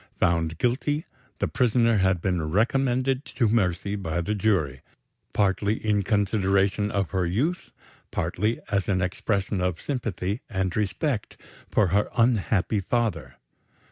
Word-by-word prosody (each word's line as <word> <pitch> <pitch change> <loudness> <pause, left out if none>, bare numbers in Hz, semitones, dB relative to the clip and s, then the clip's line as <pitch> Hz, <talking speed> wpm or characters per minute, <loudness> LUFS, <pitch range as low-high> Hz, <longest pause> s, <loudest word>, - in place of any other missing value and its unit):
Found 85 -1 +1
guilty, 145 - 0 0.3
the - - 0
prisoner 115 -2 +2
had 95 -2 +2
been 85 -5 -1
recommended 130 - +1
to 120 -3 +3
mercy 100 -2 +1
by 85 -4 -2
the 105 +5 -1
jury 90 -11 0 0.5
partly 100 +1 +1
in 105 -2 0
consideration 100 0 +1
of 100 -4 -1
her 95 -2 0
youth; 150 - -1 0.4
partly 105 +7 -1
as 100 -1 0
an 95 -2 +2
expression 95 +1 -1
of 90 -2 -1
sympathy 110 -5 -3
and 95 -4 -1
respect 105 - -1 0.3
for 100 -4 +3
her 100 +4 +2
unhappy 110 -3 +2
father. 115 +3 -1
100 Hz, 130 wpm, -26 LUFS, 95-115 Hz, 0.5 s, to